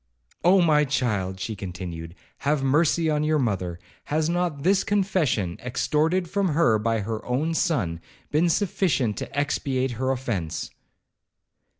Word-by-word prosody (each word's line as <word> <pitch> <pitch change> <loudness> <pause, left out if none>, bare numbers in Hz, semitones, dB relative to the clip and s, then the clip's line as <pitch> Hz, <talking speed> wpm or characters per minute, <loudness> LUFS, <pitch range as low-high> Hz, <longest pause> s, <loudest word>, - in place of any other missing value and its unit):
'Oh! 180 +2 +5
my 150 -3 +4
child,' 105 -9 -1
she 110 +4 -3
continued, 90 -3 -7 0.2
'have 145 0 0
mercy 155 +4 +3
on 150 -1 +1
your 155 0 +2
mother. 95 - -1 0.3
Has 155 +1 0
not 175 -5 -1
this 190 +3 +3
confession, 180 - 0
extorted 160 +8 +1
from 200 +2 0
her 135 -10 +4
by 115 0 0
her 110 +2 -4
own 145 +7 -1
son, 105 - 0 0.3
been 160 +3 +3
sufficient 165 - +1
to 140 - -6
expiate 135 -2 0
her 130 +2 -2
offence?' 120 -11 -2
140 Hz, 135 wpm, -25 LUFS, 110-165 Hz, 0.3 s, Oh